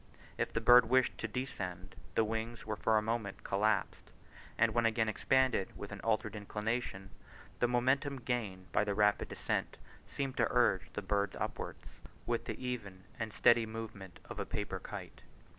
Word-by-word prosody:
If -, -, -1 dB
the 115 Hz, -, -1 dB
bird 120 Hz, 0 st, +7 dB
wished 130 Hz, 0 st, +3 dB
to 115 Hz, -, -2 dB
descend, 95 Hz, -6 st, -5 dB, 0.2 s
the 115 Hz, -, +4 dB
wings 110 Hz, +2 st, -3 dB
were 110 Hz, 0 st, -2 dB
for 110 Hz, +1 st, +2 dB
a 105 Hz, -, +2 dB
moment 110 Hz, -3 st, -2 dB
collapsed; 105 Hz, +1 st, 0 dB, 0.5 s
and 110 Hz, -1 st, +3 dB
when 120 Hz, 0 st, +3 dB
again 110 Hz, 0 st, +1 dB
expanded 130 Hz, -1 st, +2 dB
with 100 Hz, -, -7 dB
an 100 Hz, -, -6 dB
altered 110 Hz, 0 st, 0 dB
inclination, 105 Hz, -1 st, -3 dB, 0.5 s
the 120 Hz, -, +4 dB
momentum 130 Hz, +3 st, +2 dB
gained 105 Hz, -7 st, -3 dB
by -, -, +3 dB
the 100 Hz, -1 st, -1 dB
rapid 105 Hz, 0 st, +3 dB
descent -, -, -2 dB, 0.3 s
seemed 135 Hz, -2 st, -3 dB
to -, -, +4 dB
urge 120 Hz, -6 st, +2 dB
the 105 Hz, -, -4 dB
bird 100 Hz, +1 st, 0 dB
upwards -, -, -4 dB, 0.4 s
with -, -, -1 dB
the -, -, -4 dB
even 110 Hz, -7 st, -5 dB, 0.2 s
and 110 Hz, -1 st, -2 dB
steady 115 Hz, +2 st, +5 dB
movement 110 Hz, -5 st, -7 dB
of -, -, -7 dB
a -, -, 0 dB
paper -, -, -3 dB
kite. -, -, -8 dB
110 Hz, 170 wpm, -34 LUFS, 100-120 Hz, 0.5 s, bird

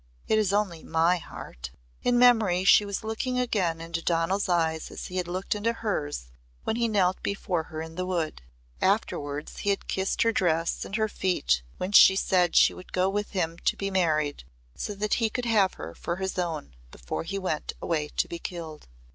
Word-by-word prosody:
It 220 Hz, -, +3 dB
is 205 Hz, -3 st, +1 dB
only 200 Hz, -5 st, 0 dB
my 165 Hz, +2 st, +2 dB
heart." -, -, -9 dB, 0.3 s
In 245 Hz, 0 st, +2 dB
memory 220 Hz, -7 st, +5 dB
she 205 Hz, +1 st, +6 dB
was 200 Hz, 0 st, -4 dB
looking 225 Hz, +3 st, -2 dB
again 195 Hz, -10 st, 0 dB
into 165 Hz, 0 st, -4 dB
Donal's 170 Hz, +4 st, 0 dB
eyes 160 Hz, -2 st, +1 dB
as -, -, -7 dB
he 185 Hz, -, -5 dB
had 180 Hz, -1 st, -1 dB
looked 185 Hz, +2 st, -2 dB
into 215 Hz, +2 st, 0 dB
hers 150 Hz, -, -3 dB, 0.3 s
when -, -, -1 dB
he 235 Hz, 0 st, +1 dB
knelt 190 Hz, -4 st, +1 dB
before 180 Hz, -4 st, -2 dB
her 155 Hz, 0 st, -6 dB
in 160 Hz, 0 st, -9 dB
the 185 Hz, +2 st, -3 dB
wood. 170 Hz, -, -2 dB, 0.4 s
Afterwards 145 Hz, +1 st, -1 dB
he 205 Hz, -, -1 dB
had 200 Hz, -, -1 dB
kissed 190 Hz, 0 st, 0 dB
her 230 Hz, -, +3 dB
dress 165 Hz, -5 st, 0 dB
and 200 Hz, -, -5 dB
her 220 Hz, 0 st, +1 dB
feet 60 Hz, -, 0 dB, 0.2 s
when 185 Hz, -, -3 dB
she 190 Hz, -1 st, +8 dB
said 180 Hz, -3 st, +2 dB
she -, -, +6 dB
would 185 Hz, -, -13 dB
go 185 Hz, +1 st, +2 dB
with 205 Hz, +1 st, -2 dB
him 170 Hz, -3 st, -1 dB
to -, -, 0 dB
be 195 Hz, 0 st, -2 dB
married 155 Hz, -, +1 dB, 0.3 s
so 205 Hz, -, -4 dB
that 210 Hz, +1 st, -1 dB
he 225 Hz, -, +3 dB
could 245 Hz, +3 st, -3 dB
have 210 Hz, -5 st, +3 dB
her 80 Hz, +2 st, -7 dB
for 170 Hz, -, -4 dB
his 190 Hz, 0 st, -3 dB
own 160 Hz, -, -3 dB, 0.2 s
before -, -, -5 dB
he 195 Hz, +4 st, -4 dB
went 185 Hz, -6 st, -2 dB
away 155 Hz, -3 st, -1 dB
to -, -, +2 dB
be 170 Hz, -, -6 dB
killed. 165 Hz, -4 st, -7 dB
185 Hz, 200 wpm, -27 LUFS, 165-205 Hz, 0.4 s, she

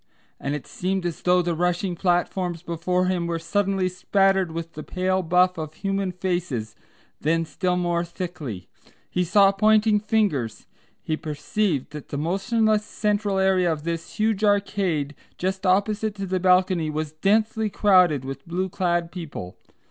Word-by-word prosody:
and 140 Hz, +1 st, -2 dB
it 145 Hz, -, -6 dB
seemed 185 Hz, 0 st, -2 dB
as 170 Hz, -2 st, -3 dB
though 180 Hz, 0 st, +3 dB
the 170 Hz, 0 st, 0 dB
rushing 180 Hz, +2 st, 0 dB
platforms 175 Hz, -1 st, 0 dB
before 180 Hz, +2 st, 0 dB
him 180 Hz, -2 st, 0 dB
were 170 Hz, -1 st, -1 dB
suddenly 195 Hz, +2 st, 0 dB
spattered 190 Hz, 0 st, +2 dB
with 165 Hz, 0 st, -6 dB
the 155 Hz, -, -7 dB
pale 185 Hz, +3 st, 0 dB
buff 180 Hz, +1 st, +2 dB
of 155 Hz, 0 st, -6 dB
human 195 Hz, -1 st, -1 dB
faces, 175 Hz, -, -2 dB
and -, -, -35 dB, 0.4 s
then 165 Hz, +2 st, +2 dB
still 180 Hz, +3 st, -1 dB
more 175 Hz, -1 st, 0 dB
thickly. 165 Hz, -, -6 dB, 0.4 s
He 180 Hz, -, +1 dB
saw 195 Hz, +3 st, +5 dB
pointing 215 Hz, +1 st, +4 dB
fingers. 205 Hz, -, 0 dB, 0.4 s
He 155 Hz, -, -1 dB
perceived 155 Hz, +1 st, -2 dB
that 150 Hz, -1 st, -9 dB
the 145 Hz, -, -4 dB
motionless 210 Hz, +7 st, +1 dB
central 210 Hz, -1 st, -1 dB
area 190 Hz, -2 st, +3 dB
of 150 Hz, -2 st, -3 dB
this 165 Hz, 0 st, -4 dB
huge 215 Hz, -1 st, 0 dB
arcade 195 Hz, -8 st, +1 dB, 0.2 s
just 190 Hz, +1 st, -2 dB
opposite 205 Hz, +3 st, +1 dB
to 195 Hz, -1 st, -4 dB
the 185 Hz, 0 st, -1 dB
balcony 180 Hz, -3 st, +3 dB
was 155 Hz, 0 st, -3 dB
densely 215 Hz, +6 st, +1 dB
crowded 180 Hz, -, +4 dB
with 135 Hz, +2 st, -7 dB
blue 185 Hz, +3 st, -2 dB
clad 175 Hz, -2 st, 0 dB
people. 150 Hz, -, -7 dB
180 Hz, 155 wpm, -24 LUFS, 165-195 Hz, 0.4 s, saw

